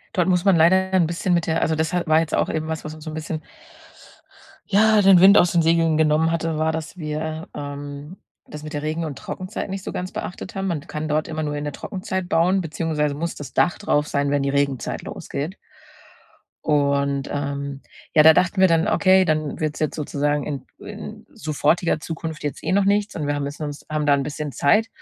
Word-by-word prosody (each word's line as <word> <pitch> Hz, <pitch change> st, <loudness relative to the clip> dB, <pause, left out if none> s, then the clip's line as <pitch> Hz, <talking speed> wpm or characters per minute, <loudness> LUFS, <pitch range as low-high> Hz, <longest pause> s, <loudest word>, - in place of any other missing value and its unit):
Dort 180 Hz, -2 st, +2 dB
muss 180 Hz, 0 st, +2 dB
man 195 Hz, -2 st, +5 dB
leider 170 Hz, +3 st, +5 dB, 0.2 s
ja -, -, +5 dB
'n 170 Hz, -, +3 dB
bisschen 175 Hz, +2 st, -1 dB
mit 170 Hz, 0 st, +1 dB
der 160 Hz, 0 st, +1 dB
also, 160 Hz, -, +1 dB
das 160 Hz, +1 st, -1 dB
ha 180 Hz, -1 st, 0 dB
war 155 Hz, 0 st, +4 dB
jetzt 160 Hz, -1 st, -1 dB
auch -, -, +1 dB
eben 155 Hz, 0 st, -2 dB
was, 160 Hz, -1 st, -4 dB
was 155 Hz, -, -5 dB
uns 155 Hz, -1 st, -12 dB
so 160 Hz, -, -6 dB
'n 155 Hz, -, -6 dB
bisschen 155 Hz, 0 st, -4 dB, 1.3 s
ja, 215 Hz, +1 st, +4 dB
den 195 Hz, -2 st, +7 dB
Wind 195 Hz, +3 st, +8 dB
aus 175 Hz, -, +5 dB
den 170 Hz, -, +3 dB
Segeln 165 Hz, -1 st, +3 dB
genommen 155 Hz, +1 st, +3 dB
hatte, 165 Hz, -1 st, -1 dB
war, 160 Hz, +1 st, +1 dB
dass 160 Hz, +2 st, -6 dB
wir, 155 Hz, 0 st, -4 dB
ähm, 145 Hz, +2 st, -7 dB, 0.3 s
das 150 Hz, 0 st, -9 dB
mit 155 Hz, -, -7 dB
der 145 Hz, -, -3 dB
Regen 155 Hz, +2 st, -2 dB
und 150 Hz, -4 st, -5 dB
Trockenzeit 185 Hz, +2 st, -6 dB
nicht 190 Hz, 0 st, -5 dB
so -, -, -5 dB
ganz 180 Hz, +1 st, -4 dB
beachtet 180 Hz, -, -6 dB
haben. 195 Hz, 0 st, -2 dB
Man 170 Hz, -4 st, -1 dB
kann 155 Hz, +1 st, -4 dB
dort 155 Hz, +1 st, 0 dB
immer 155 Hz, -1 st, -3 dB
nur 150 Hz, -1 st, -2 dB
in 145 Hz, 0 st, -4 dB
der 145 Hz, -, -4 dB
Trockenzeit 185 Hz, +2 st, -4 dB
bauen, 180 Hz, +4 st, +3 dB
beziehungsweise 155 Hz, -2 st, -1 dB
muss 165 Hz, +4 st, -4 dB
das 140 Hz, -3 st, -9 dB
Dach 175 Hz, -, +2 dB
drauf 150 Hz, -7 st, 0 dB
sein, 140 Hz, -1 st, 0 dB
wenn 145 Hz, -1 st, +1 dB
die 140 Hz, -, 0 dB
Regenzeit 140 Hz, -2 st, -1 dB
losgeht. 160 Hz, +8 st, -5 dB, 1.1 s
Und, 140 Hz, -2 st, +1 dB
ähm, 140 Hz, -1 st, -4 dB, 0.3 s
ja, 155 Hz, -, +7 dB
da 160 Hz, +1 st, +9 dB
dachten 180 Hz, +3 st, +2 dB
wir 190 Hz, -, +6 dB
dann: 165 Hz, +2 st, +3 dB
„Okay, 190 Hz, -2 st, +4 dB
dann 155 Hz, -3 st, -1 dB
wird's 155 Hz, -1 st, -2 dB
jetzt 155 Hz, -, 0 dB
sozusagen 145 Hz, -1 st, -1 dB
in 140 Hz, -3 st, -5 dB
in -, -, -9 dB
sofortiger 155 Hz, +3 st, 0 dB
Zukunft 160 Hz, 0 st, -6 dB
jetzt 145 Hz, -1 st, -5 dB
eh -, -, -1 dB
noch 195 Hz, +1 st, +3 dB
nichts. 205 Hz, +1 st, +1 dB
Und 150 Hz, -3 st, -3 dB
wir 145 Hz, -, 0 dB
haben 145 Hz, -, -2 dB
jetzt 145 Hz, +1 st, -7 dB
uns 145 Hz, -2 st, -6 dB
haben 155 Hz, -1 st, -1 dB
da 145 Hz, -, +5 dB
'n 140 Hz, -1 st, +1 dB
bisschen 150 Hz, 0 st, -5 dB
Zeit.“ 215 Hz, +10 st, +3 dB
155 Hz, 225 wpm, -22 LUFS, 145-175 Hz, 1.3 s, da